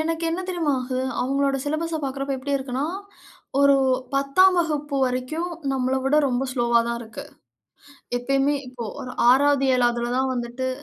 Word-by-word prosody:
எனக்கு 330 +1 -2
என்ன 340 +3 -2
தெரியுமா 340 -5 0
ஆகும்? 255 +1 -2
அவுங்களோட 275 +1 +1
சிலபஸ 320 +2 -2
பாக்குறப்போ 275 0 -3
எப்பிடி 280 +2 -1
இருக்குன்னா? 265 0 -3 0.8
ஒரு 280 0 +6 0.4
10ஆம் 360 +8 +4
வகுப்பு 295 -3 -2
வரைக்கும் 255 +7 -2 0.2
நம்மள 260 0 0
விட 295 - +3
ரொம்ப 255 +2 -1
ஸ்லோவா 235 -2 +2
தான் 235 0 -3
இருக்கு. 225 -1 -9 0.9
எப்பயுமே 275 +3 +1
இப்ப 240 -3 -6
ஒரு 250 - -7 0.2
6வது 275 +1 +4
7வதுல 240 0 +1
தான் 265 0 +1
வந்துட்டு 240 +2 -3
270 Hz, 145 wpm, -23 LUFS, 250-290 Hz, 0.9 s, ஒரு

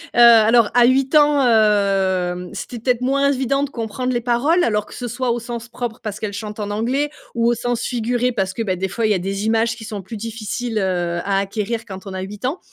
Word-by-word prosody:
heu, - - +2
alors 230 -1 +7
à 245 -1 +7
8 265 +3 +2
ans, 295 -2 +5
heu, 195 -5 +2
c'était 245 - -6
peut-être 245 +1 0
moins 275 +2 +2
évident 275 +1 0
de 285 - -3
comprendre 250 +2 -3
les 240 - 0
paroles 260 +9 +2
alors 210 -2 +1
que - - -14
ce 245 - -5
soit 240 +1 -1
au 240 - -1
sens 235 0 -6
propre 240 -1 -5
parce 215 -1 -5
qu'elles 215 -2 -4
chantent 210 +1 -6
en 205 -1 -3
anglais 250 +8 0 0.2
ou 235 -1 +1
au 240 - +3
sens 245 0 -2
figuré 245 +1 0
parce 195 -4 -2
que, 230 - -4
beh, 190 -4 -1
des 190 +2 -2
fois 225 +3 -1
il 215 - +1
y - - +4
a - - -1
des 195 +3 -3
images 225 0 +1
qui 225 - -11
sont 210 -2 -6
plus 205 +5 -8
difficiles, 225 +1 -4
heu, 175 -3 -1
à 195 -1 +1
acquérir 215 +3 -3
quand 190 -2 -9
on 195 - -7
a 185 - -4
8 205 +4 -7
ans. 290 +8 -1
225 Hz, 245 wpm, -20 LUFS, 205-245 Hz, 0.2 s, alors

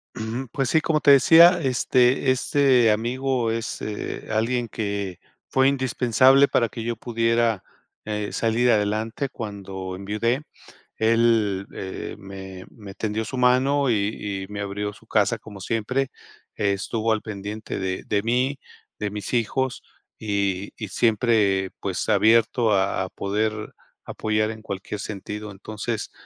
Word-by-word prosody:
Ujú. 115 +3 -4
Pues, 135 -3 -1
sí, 160 - +4
como 155 -1 +1
te 145 - +6
decía, 170 +6 +7
este, 130 0 +2
este 130 -3 +3
amigo 120 +2 0
es, 115 0 -4
eh, 105 -1 -5
alguien 115 +2 0
que 100 -4 -4 0.3
fue 130 0 +3
indispensable 130 0 +4
para 115 -2 +2
que 115 - -7
yo 120 0 -2
pudiera, 115 -2 +1 0.4
h, 105 -1 -3
salir 115 +2 +2
adelante 110 +5 0
cuando 95 -5 -6
enviudé. 105 +8 -1 0.6
Él, 110 -3 +2
eh, 95 -1 -6
me 95 -1 -9
me 100 -4 -11
tendió 110 +1 -2
su 130 +4 -5
mano 130 +3 +3
y 100 -2 -1
y - - -8
me 100 0 -5
abrió 100 +1 -3
su 110 +1 -19
casa 110 +2 +2
como 105 -2 -11
siempre, 120 +6 -1 0.4
estuvo 105 +3 -1
al 110 -1 +1
pendiente 105 0 -6
de 95 -1 -3
de 100 -1 0
mí, 125 +5 0 0.4
de 105 - -2
mis 105 +4 -6
hijos, 125 +2 0 0.4
y 100 -2 -1
y 110 - -6
siempre, 105 -3 +2
pues, 95 -3 -3
abierto 110 +2 +4
a 95 0 +1
a - - -8
poder 105 +2 -2 0.3
apoyar 110 0 -1
en 110 -1 -9
cualquier 100 0 -6
sentido. 105 +1 -6
Entonces, 105 +3 -5
110 Hz, 140 wpm, -24 LUFS, 100-125 Hz, 0.6 s, decía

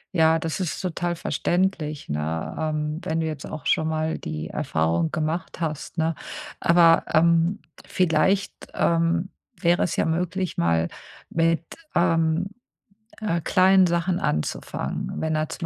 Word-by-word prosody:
Ja, 160 -1 +4
das 160 +2 -3
ist 180 -4 -2
total 175 -1 -2
verständlich, 170 -4 -1
ne? 75 +2 -3
Ähm, 155 0 -2
wenn 160 +1 -1
du - - -1
jetzt 155 -3 -5
auch 155 - -7
schon 160 - +2
mal 160 0 -1
die 75 0 -5
Erfahrung 80 +1 0
gemacht 160 +3 -3
hast, 155 0 -4
ne? 160 0 +1 0.4
Aber, 170 -1 +5
ähm, 170 +3 +3 0.3
vielleicht, 185 +3 +2 0.2
ähm, 170 +2 +1 0.3
wäre 175 +1 +2
es 175 - -1
ja - - +2
möglich, 180 +3 -1
mal 85 0 +2 0.4
mit, 165 0 +1 0.3
ähm, 165 0 +2 0.7
äh, 190 -6 -1
kleinen 185 +2 +5
Sachen 170 +1 0
anzufangen. 75 - -2
Wenn 160 0 -1
da 155 0 0
zum - - -5
165 Hz, 140 wpm, -24 LUFS, 155-175 Hz, 0.7 s, Aber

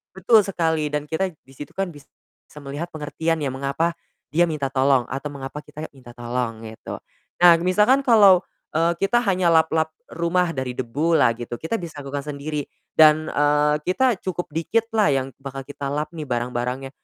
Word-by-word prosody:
Betul 210 +3 +5
sekali. 160 -5 0
Dan 150 0 -3
kita 175 +4 0
di 135 -3 -22
situ 145 - -9
kan 195 -1 -1
bisa 145 -2 -15 0.6
melihat 145 +5 -5
pengertian 160 +1 -2
ya, 140 - -1
mengapa 140 +5 -1 0.4
dia 170 +3 +4
minta 145 -4 -2
tolong. 135 -1 +3
Atau 140 +3 -4
mengapa 140 +1 -7
kita 150 +1 -8
minta 130 -3 -14
tolong 120 -2 -3
gitu. 110 0 -8 0.4
Nah 175 -1 +9
misalkan 210 +9 +4
kalau, 200 -7 +7 0.3
eee, 165 +2 +2
kita 240 +6 +2
hanya 185 -5 +2
lap-lap 160 0 +2 0.2
rumah 170 +1 0
dari 130 -1 -2
debulah 140 +3 +2
gitu, 120 0 -6
kita 160 +8 -2
bisa 165 -5 -8
lakukan 140 0 -5
sendiri. 145 0 -4 0.3
Dan, 155 0 +6
eee, 150 0 +2
kita 230 +4 +2
cukup 175 -2 -4
dikitlah 220 +7 0
yang 135 -1 0
bakal 135 0 -7
kita 145 0 -7
lap 150 +1 -2
nih 155 - -5
barang-barangnya, 125 +1 -3
150 Hz, 165 wpm, -23 LUFS, 135-170 Hz, 0.6 s, Nah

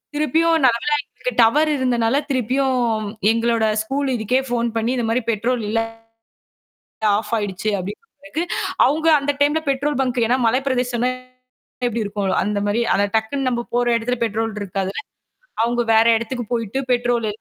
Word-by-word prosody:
திருப்பியும் 325 +2 +2
நல்ல 235 -2 +4
வேளை 295 0 +2
எங்களுக்கு - - -6
டவர் 300 +7 +3
இருந்ததுனால 250 -2 +1 0.2
திருப்பியும் 260 +1 +1 0.5
எங்களோட 230 -1 +1 0.2
ஸ்கூல் 275 +4 -2
இதுக்கே 240 +4 +1
போன் 235 -1 0
பண்ணி, 230 +2 0
இந்த 235 - -1
மாதிரி 245 +2 +1
பெட்ரோல் 230 +2 -1
இல்ல 225 +1 +1 1.4
ஆஃப் 215 +1 -5
ஆயிடுச்சு 205 0 -2
அப்படின்னு 200 - -6
சொன்னதுக்கு, 290 +3 -5 0.4
அவங்க 310 +3 0
அந்த 285 +1 0
டைம்ல 295 +2 +3
பெட்ரோல் 275 +1 0
பாங்க் 250 -1 -1
ஏன்னா 250 +2 +2
மலைப்பிரதேசம் 250 -1 0 0.8
எப்படி 230 -1 -2
இருக்கும்? 200 -1 -3 0.2
அந்த 205 0 -1
மாதிரி. 210 +3 +1
ஆனா 200 - +2
டக்குன்னு 255 +5 0
நாம 240 -1 -2
போற 245 0 +2
இடத்துல 245 +2 -2
பெட்ரோல் 225 0 -1
இருக்காது. 195 -1 -3 0.7
அவங்க 240 +1 +1
வேற 220 +1 +5
இடத்துக்குப் 235 0 -5
போயிட்டு 230 +2 -2
பெட்ரோல் 240 -2 +1
240 Hz, 150 wpm, -20 LUFS, 225-270 Hz, 1.4 s, வேற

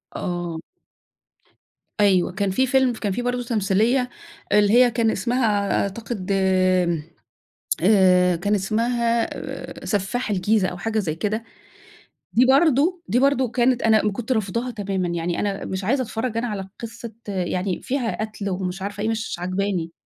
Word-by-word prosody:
آه. 175 -2 -3 1.4
أيوه 190 -4 +3
كان 195 +1 -1
في 260 +8 +2
فيلم، 260 -1 +3
كان 210 -3 -3
في 210 - -2
برضه 245 0 -1
تمثيلية 230 +3 +1 0.4
اللي 205 0 +4
هي 245 0 +6
كان 225 -1 +1
اسمها 215 -1 0
أ - - +1
أعتقد 200 -1 -5
آمم، 185 -4 +2 0.8
آآ 180 -2 +5
كان 200 +5 0
اسمها 230 +3 +1
آآ، - - -8
سفاح 215 +4 -1
الجيزة 205 0 +2
أو 180 - -5
حاجة 220 +5 -1
زي 165 -7 -2
كده، 215 +5 -2 0.9
دي 245 +3 +5
برضه 300 +5 +3
دي 245 - +2
برضه 265 -2 +2
كانت 250 0 +2
أنا 220 -2 +3
م 210 - +2
كنت 225 +4 -5
رافضاها 230 +2 -1
تمامًا، 195 -4 -2
يعني 170 0 -2
أنا 200 -1 -2
مش 190 +1 -4
عايزة 260 +8 +1
أتفرّج 225 0 -3
أنا 240 +2 -1
على 195 -3 -5
قِصّة 230 0 -7 0.2
يعني 185 -1 -2
فيها 250 -5 -2
قتْل 215 -2 -4
ومش 185 0 -3
عارفة 205 +1 -4
إيه، 220 - 0
مش 225 -1 -2
عاجباني. 185 -2 -2
210 Hz, 155 wpm, -23 LUFS, 190-235 Hz, 1.4 s, هي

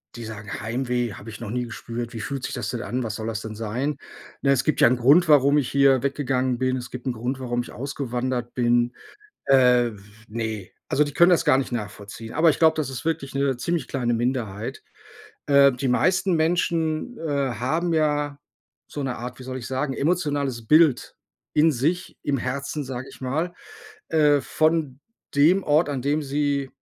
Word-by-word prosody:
Die 120 -1 -7
sagen: 105 -1 -7
„Heimweh 120 0 -1
habe 110 +3 -10
ich - - -10
noch 115 -3 -6
nie 125 +1 -2
gespürt, 120 +1 -6
wie 115 - -5
fühlt 135 0 -4
sich - - -4
das - - -3
denn 120 -1 -4
an, 125 +1 -2
was 110 -3 -3
soll 110 0 -5
das 110 -1 -3
denn 110 -1 -7
sein?“ 125 +7 -2 0.5
Ne, 140 - +4
es 130 -2 +2
gibt 155 - 0
ja - - +7
'nen 125 +1 +2
Grund, 150 +8 +5
warum 145 -1 +5
ich 140 - 0
hier 140 -2 +4
weggegangen 130 -3 0
bin. 130 0 +1
Es 125 0 -7
gibt 125 +1 -7
'nen 125 - 0
Grund, 125 +4 -3
warum 120 -1 -1
ich - - -11
ausgewandert 125 -2 -3
bin. 120 0 +2 0.5
Äh, 125 -3 +4
w 100 - -14 0.3
ne, 110 -3 -4 0.2
also, 150 +1 +3
die 145 - -6
können 175 +3 +6
das 165 -2 +3
gar 140 -3 +5
nicht 135 - -2
nachvollziehen. 105 0 -6
Aber 160 +2 +4
ich - - 0
glaube, 160 -1 +5
das 155 -4 -2
ist 135 +4 -7
wirklich 150 -4 -2
'ne 140 -2 +1
ziemlich 160 +2 -2
kleine 120 -3 -1
Minderheit. 115 -3 -2 0.6
Äh, 140 -1 +6
die 130 +2 -3
meisten 185 +8 +2
Menschen, 165 +5 0
äh, 160 -2 -4 0.2
haben 160 +9 -1
ja 145 -2 0 0.5
so 145 - -6
'ne 130 -2 -2
Art, 125 +2 -7
wie 130 - -10
soll 130 0 -5
ich 120 - -7
sagen, 135 +1 -2
emotionales 145 -7 -1
Bild 155 -3 +4 0.4
in 160 +2 +5
sich, 155 +8 -1
im 140 -1 +1
Herzen, 140 +4 -3
sage 130 0 -6
ich - - -15
mal, 155 +7 -2 0.5
äh, 150 -3 +4
von 155 -3 0 0.4
dem 175 +7 +5
Ort, 150 +2 +3
an 135 -3 -3
dem 145 +2 +1
sie 140 -1 -1
135 Hz, 195 wpm, -24 LUFS, 120-150 Hz, 0.6 s, ja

